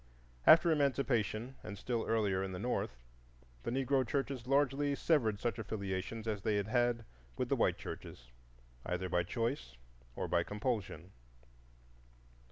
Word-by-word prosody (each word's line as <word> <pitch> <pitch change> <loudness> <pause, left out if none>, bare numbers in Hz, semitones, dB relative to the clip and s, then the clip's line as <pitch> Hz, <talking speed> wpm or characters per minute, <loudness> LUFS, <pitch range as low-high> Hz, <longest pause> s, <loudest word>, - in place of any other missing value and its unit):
After 165 +1 +8
Emancipation, 135 -5 +1
and 105 -2 -7
still 115 +2 -2
earlier 105 -4 +2
in 95 -1 -4
the - - -4
North, 100 - -2 0.6
the - - -3
Negro 135 +1 +2
churches 135 -1 -2
largely 140 +1 +2
severed 115 -11 +2
such 120 0 -1
affiliations 105 +1 -4
as 105 -2 -1
they 105 +1 +1
had 100 +1 -1
had 120 -1 +2 0.3
with - - -1
the - - +3
white - - +2
churches, - - -8 0.5
either 90 +1 -2
by 90 - +2
choice 115 - -2 0.4
or - - -2
by 85 -1 +2
compulsion. 105 - -3
115 Hz, 140 wpm, -34 LUFS, 100-130 Hz, 0.6 s, After